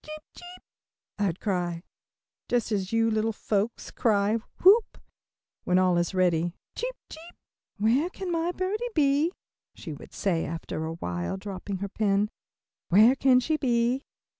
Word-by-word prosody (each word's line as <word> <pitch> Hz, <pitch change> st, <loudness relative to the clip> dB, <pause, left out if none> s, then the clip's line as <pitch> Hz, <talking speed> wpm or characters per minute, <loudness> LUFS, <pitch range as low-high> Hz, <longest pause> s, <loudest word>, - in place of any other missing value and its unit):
"Cheep, 310 Hz, 0 st, -9 dB
cheep," 355 Hz, +1 st, -12 dB, 0.6 s
I'd 195 Hz, -4 st, 0 dB
cry, 175 Hz, -4 st, -2 dB, 0.7 s
just 240 Hz, -2 st, 0 dB
as 195 Hz, -3 st, -1 dB
you 225 Hz, 0 st, +2 dB
little 220 Hz, +1 st, +1 dB
folks 215 Hz, +1 st, -2 dB
cry 210 Hz, -1 st, +2 dB, 0.3 s
"whoop," 410 Hz, +4 st, +6 dB, 0.7 s
when 180 Hz, -, +2 dB
all 185 Hz, -1 st, +3 dB
is 175 Hz, +2 st, -1 dB
ready, 175 Hz, -1 st, +1 dB, 0.2 s
"cheep, -, -, -3 dB
cheep." 330 Hz, +2 st, -12 dB, 0.4 s
"Where 240 Hz, -, +2 dB
can 375 Hz, -1 st, -5 dB
my 335 Hz, +1 st, 0 dB
birdie 380 Hz, +5 st, -2 dB
be?" 295 Hz, +2 st, +3 dB, 0.4 s
she -, -, -7 dB
would -, -, -12 dB
say 175 Hz, -5 st, 0 dB
after 160 Hz, 0 st, -4 dB
awhile, 90 Hz, -, -3 dB
dropping 195 Hz, 0 st, -5 dB
her -, -, -3 dB
pen. 205 Hz, 0 st, +1 dB, 0.6 s
"Where 215 Hz, +8 st, +6 dB
can 265 Hz, -2 st, +4 dB
she 310 Hz, +5 st, 0 dB
be?" 245 Hz, -1 st, +1 dB
220 Hz, 140 wpm, -27 LUFS, 185-305 Hz, 0.7 s, whoop